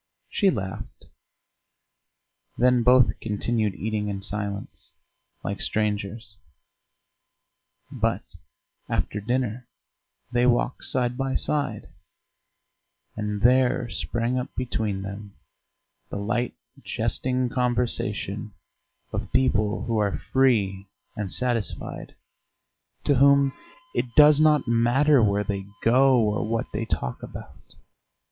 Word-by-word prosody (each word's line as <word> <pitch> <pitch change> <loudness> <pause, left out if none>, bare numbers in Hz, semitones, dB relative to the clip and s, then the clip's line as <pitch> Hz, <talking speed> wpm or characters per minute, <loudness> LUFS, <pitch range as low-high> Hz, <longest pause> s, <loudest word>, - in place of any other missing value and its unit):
She 200 - +3
laughed. 95 - -5 1.5
Then 125 0 +4
both 125 +1 +4
continued 105 -1 -1
eating 105 0 -2
in 100 -1 -4
silence, 100 -1 -4 0.5
like 100 - -4
strangers, 105 0 -2 1.5
but - - -2 0.6
after 105 - -2
dinner 125 +1 -2 0.6
they 120 0 +3
walked 120 +1 +1
side 125 -1 0
by 135 -1 -1
side; 140 -8 -1 1.3
and 105 -1 -3
there 125 -1 +3
sprang 115 +10 -1
up 125 - -4
between 110 -6 -2
them 100 +1 -8 0.7
the - - -5
light 110 +4 -1 0.3
jesting 125 -1 -1
conversation 115 -5 -1 0.6
of - - -4
people 110 -5 +1
who 115 -2 0
are 100 -2 0
free 100 -7 +1 0.3
and 105 -5 -4
satisfied, 120 -4 -2 0.9
to 145 - +3
whom 140 0 +5 0.4
it 125 - -2
does 150 -1 +7
not 150 -4 +4
matter 120 +5 +4
where 105 -1 +2
they 100 -1 -4 0.2
go 130 +3 +5
or 105 -2 +1
what 115 +2 -1
they 110 +2 -2
talk 65 - -3
about. - - -11
115 Hz, 105 wpm, -25 LUFS, 105-125 Hz, 1.5 s, does